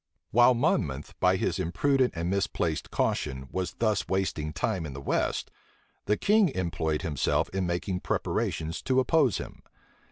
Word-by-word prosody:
While 120 +2 +6
Monmouth, 80 - 0
by - - +4
his - - -1
imprudent 130 - +1
and 85 +1 -2
misplaced 90 -4 -1
caution, 65 -2 -1
was 95 -1 -2
thus 110 -3 0
wasting 95 -5 -1
time 95 +3 -1
in 70 - -7
the 70 - -7
west, 70 - -1 0.5
the 105 +1 +2
king 210 -2 +4
employed 80 -4 -1
himself 75 -4 0
in 95 -1 -2
making 85 +1 -2
preparations 80 -2 -2
to 130 0 +2
oppose 130 -2 +3
him. - - -8
95 Hz, 150 wpm, -28 LUFS, 80-120 Hz, 0.5 s, While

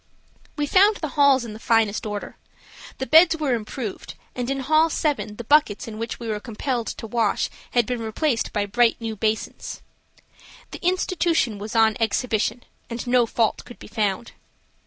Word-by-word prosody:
We 295 - -1
found 400 +7 +5
the 310 -5 -4
halls 275 -3 +4
in 220 - -7
the 215 - -10
finest 225 -2 +1
order. 205 -1 -5 0.6
The 265 - -3
beds 325 +3 +6
were 295 -5 0
improved, 225 -1 -5 0.2
and 245 0 -3
in 275 0 -1
hall 310 +4 +3
7 290 -10 -1
the 235 - -7
buckets 265 -5 +2
in 220 -1 -7
which 230 +1 -4
we 235 - -6
were 215 -1 -2
compelled 235 +1 -3
to - - -6
wash 225 -2 0 0.2
had 240 -2 +3
been 245 -1 -3
replaced 230 +3 -1
by 205 -1 0
bright 235 +3 +2
new 225 -1 -4
basins. 215 +1 -3 0.9
The - - -9
institution 340 - +1
was 210 +3 -6
on 220 0 +4
exhibition, 225 +1 0 0.3
and 235 +1 -5
no 245 -1 +3
fault 225 0 0
could 245 - -13
be - - -12
found. 210 +1 -2
235 Hz, 175 wpm, -23 LUFS, 220-280 Hz, 0.9 s, beds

